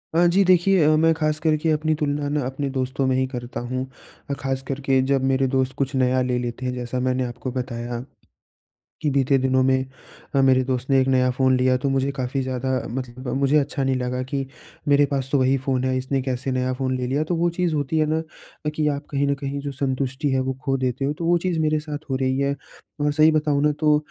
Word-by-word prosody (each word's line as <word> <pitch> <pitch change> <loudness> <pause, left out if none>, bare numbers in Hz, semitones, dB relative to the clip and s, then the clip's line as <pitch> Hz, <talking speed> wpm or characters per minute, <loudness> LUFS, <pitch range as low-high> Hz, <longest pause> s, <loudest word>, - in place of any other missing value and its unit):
अ, 175 - +5
जी 195 +3 +4
देखिए 185 0 +4
अ, 155 +1 +5
मैं 165 +1 +4
ख़ास 155 -1 0
करके 155 0 +1
अपनी 155 +1 +1
तुलना 145 -1 -1
ना 150 0 0
अपने 135 +2 -3
दोस्तों 130 0 -1
में 130 - +2
ही 130 - +2
करता 125 -2 -6
हूँ 130 0 -1 0.4
अ, 140 - 0
ख़ास 135 -1 -3
कर 135 0 -3
के 135 -1 +4
जब 135 -1 +2
मेरे 135 0 +2
दोस्त 130 0 0
कुछ 140 0 -1
नया 130 0 +2
ले 125 -1 0
लेते 120 +1 -4
हैं। 125 - -1
जैसा 125 0 -3
मैंने 130 0 0
आपको 125 +1 -5
बताया 120 -1 -4 1.0
कि 150 - +1
बीते 135 0 +3
दिनों 130 0 +2
में 130 0 +2 0.5
अ, 135 - +5
मेरे 130 -1 +4
दोस्त 130 0 -3
ने 135 -1 +5
एक 130 - 0
नया 130 -1 +3
फ़ोन 130 0 +2
लिया 130 0 +3
तो 140 +2 -1
मुझे 135 +1 +1
काफ़ी 135 0 -2
ज़्यादा 130 0 -2 0.2
मतलब 125 +1 -6
ब - - -2
मुझे 140 +2 +3
अच्छा 140 -1 0
नहीं 135 0 +1
लगा 125 0 -2
कि 135 -1 0 0.4
मेरे 145 0 +5
पास 135 -1 -1
तो 140 - +3
वही 130 +1 +3
फ़ोन 130 -1 -1
है, 130 0 +1
इसने 130 +1 -1
कैसे 130 0 -2
नया 130 0 0
फ़ोन 130 0 -1
ले 125 -1 -2
लिया। 140 +4 0
तो 170 +3 -2
वो 170 +1 +2
चीज़ 170 -1 -1
होती 145 +2 -1
है 155 - +3
ना 160 +1 0 0.5
कि 155 -1 +1
आप 145 0 -2
कहीं 140 0 +1
न 140 - +2
कहीं 140 0 -4
जो 140 0 -4
संतुष्टि 135 +1 -2
है 130 - +2
वो 130 0 -1
खो 135 -1 +1
देते 130 +1 -1
हो, 145 - 0
तो 165 +2 -5
वो 175 +1 +4
चीज़ 175 -2 -1
मेरे 155 0 +2
साथ 150 -1 -7
हो 130 - 0
रही 130 0 0
है। 140 0 +1 0.5
और 145 0 +2
सही 155 +1 +5
बताऊँ 150 -2 +1
ना 150 - +4
तो 150 -1 +4
135 Hz, 245 wpm, -23 LUFS, 130-150 Hz, 1.0 s, अ